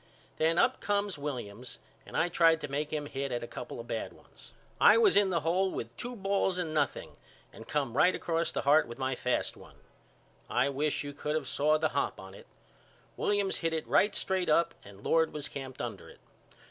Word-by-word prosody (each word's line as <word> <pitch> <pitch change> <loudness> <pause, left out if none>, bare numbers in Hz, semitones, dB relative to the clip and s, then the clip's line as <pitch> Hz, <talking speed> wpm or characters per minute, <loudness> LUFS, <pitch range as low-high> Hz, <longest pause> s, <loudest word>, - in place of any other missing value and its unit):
Then 165 +2 +2
up 255 - +3
come 205 0 0
Williams 125 -5 -6 0.3
and - - -5
I 170 - +3
tried 165 -2 +4
to 145 - -4
make 145 +2 -2
him 150 -1 -2
hit 140 -1 -4
at 120 -1 -2
a - - -5
couple 120 0 -7
of 115 - -7
bad 115 - -4
ones. - - -18 0.2
I - - +7
was 440 -4 +5
in 205 -1 +5
the 170 -3 0
hole 180 +5 +1
with 115 -8 -6
two 245 0 -6
balls 195 -2 0
and 165 -3 -2
nothing 145 -4 -1 0.4
and 115 - -12
come 140 -5 -1
right 180 +6 +4
across 165 0 -1
the - - -2
heart 150 +1 +5
with 120 0 -8
my 130 0 -1
fast 125 0 -1
one. - - -15 0.7
I 125 +3 +2
wish 145 +2 -1
you 145 0 -6
could 150 +1 -3
of 155 - -2
saw 150 +2 +2
the 155 0 +1
hop 140 - -1
on 95 0 -10
it. - - -14 0.7
Williams 205 -2 0
hit 165 -1 -1
it 160 - -3
right 205 0 +3
straight 190 -2 -1
up 165 +2 +3
and 100 0 -14
Lord 165 0 +2
was 150 -1 -5
camped 130 -2 -7
under 110 -5 -6
it. - - -16
150 Hz, 210 wpm, -30 LUFS, 130-175 Hz, 0.7 s, I